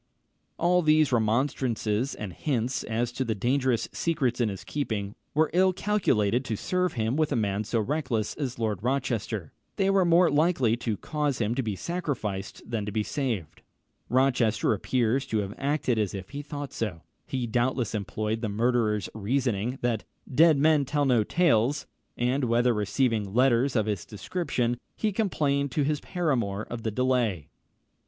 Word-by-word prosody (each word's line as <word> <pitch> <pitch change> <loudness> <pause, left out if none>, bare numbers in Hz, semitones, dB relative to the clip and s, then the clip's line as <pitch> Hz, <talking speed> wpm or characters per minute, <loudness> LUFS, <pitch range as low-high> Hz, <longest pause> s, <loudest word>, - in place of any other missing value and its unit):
] - - -47
All 180 +1 +3
these 155 -3 +4
remonstrances, 115 0 0
and 100 -4 -6
hints 130 - -1
as 115 +2 -1
to 130 +2 -2
the 115 -3 -1
dangerous 125 +2 +1
secrets 130 -7 0
in 115 - +2
his 95 -2 -6
keeping, 105 -8 -3 0.2
were 155 0 +3
ill 185 +1 +4
calculated 130 - +1
to 110 - -2
serve 180 - 0
him 115 +2 -1
with 155 0 +1
a - - +1
man 105 -2 0
so 115 +1 0
reckless 125 -3 -1
as 135 -5 -4
Lord 110 -5 -1
Rochester: 120 - -2 0.2
they 195 0 +2
were 195 -1 +4
more 170 0 +5
likely 145 -6 +3
to 115 -3 -2
cause 150 0 -1
him 110 0 +1
to 135 - 0
be 110 -5 -2
sacrificed 115 - -4
than 115 -3 -2
to - - -2
be 105 +1 0
saved. 110 - -3 0.5
Rochester 125 -4 +2
appears 125 +4 0
to 110 - -1
have 100 -1 -2
acted 135 -4 0
as 105 -2 -1
if 95 -1 -7
he 145 +1 -4
thought 145 -2 -6
so. 95 -8 -4 0.2
He 130 -2 -2
doubtless 120 0 0
employed 110 +1 -2
the 110 - -1
murderer's 110 -2 +1
reasoning, 120 +1 -1
that 115 -3 0 0.3
"dead 160 +2 +6
men 150 0 +4
tell 145 +2 0
no 125 -5 +4
tales," 145 - +2 0.3
when, 125 0 0
after 120 +1 +3
receiving 105 -1 0
letters 130 +1 +3
of 110 -3 +2
this 105 -4 -2
description, 120 - -2 0.2
he 215 - 0
complained 145 -9 0
to 150 - +1
his 150 +1 0
paramour 120 - -1
of 120 -1 -4
the 110 - -1
delay. 115 - 0
120 Hz, 170 wpm, -27 LUFS, 110-145 Hz, 0.5 s, dead